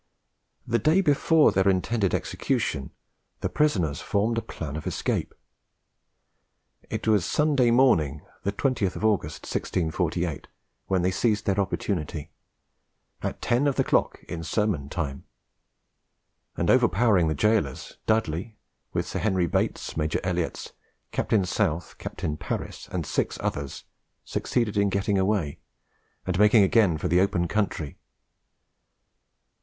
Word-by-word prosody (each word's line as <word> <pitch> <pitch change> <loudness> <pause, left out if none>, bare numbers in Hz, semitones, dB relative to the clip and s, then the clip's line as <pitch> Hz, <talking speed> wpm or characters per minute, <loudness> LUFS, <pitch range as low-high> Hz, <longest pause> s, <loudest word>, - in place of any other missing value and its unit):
The 115 0 +1
day 160 +5 +4
before 155 -1 +4
their 95 0 +2
intended 95 +2 +1
execution, 70 - -1 0.5
the - - -1
prisoners 90 - +1
formed 110 +3 0
a - - -5
plan 75 -8 -6
of 80 - -5
escape. - - -1 1.6
It - - -4
was 105 -4 +4
Sunday 145 - +2
morning, 85 - +3 0.2
the 100 - -1
20th 105 -4 -1
August, 100 -9 0
1648, 85 -1 -2 0.4
when 95 -2 +1
they 90 - +2
seized 105 +2 +1
their 100 0 +1
opportunity, 85 -6 -2 0.9
"at - - -4
ten 125 +4 +2
of 140 - +1
the - - +2
cloeke - - +1
in 85 - -5
sermon 80 -4 -1
time;" 70 -4 -4 1.3
and, - - +2
overpowering 95 -3 +4
the 80 - 0
gaolers, 80 -5 0
Dudley, 110 -1 0 0.4
with - - 0
Sir - - -3
Henry 95 -5 +1
Bates, 85 - -1
Major 80 0 0
Elliotts, 90 -2 -2 0.4
Captain 100 -4 +1
South, 90 -4 -1
Captain 75 -1 -4
Paris, - - -5
and 90 -4 -2
six - - -1
others, 70 -1 -4 0.4
succeeded 115 -5 -1
in 100 0 +3
getting 100 0 +1
away, 95 -7 0 0.7
and 95 0 -1
making 105 0 +6
again 95 -4 +4
for - - -2
the 90 +2 +4
open 95 -3 +1
country. 90 -8 -2
95 Hz, 130 wpm, -26 LUFS, 80-110 Hz, 1.6 s, making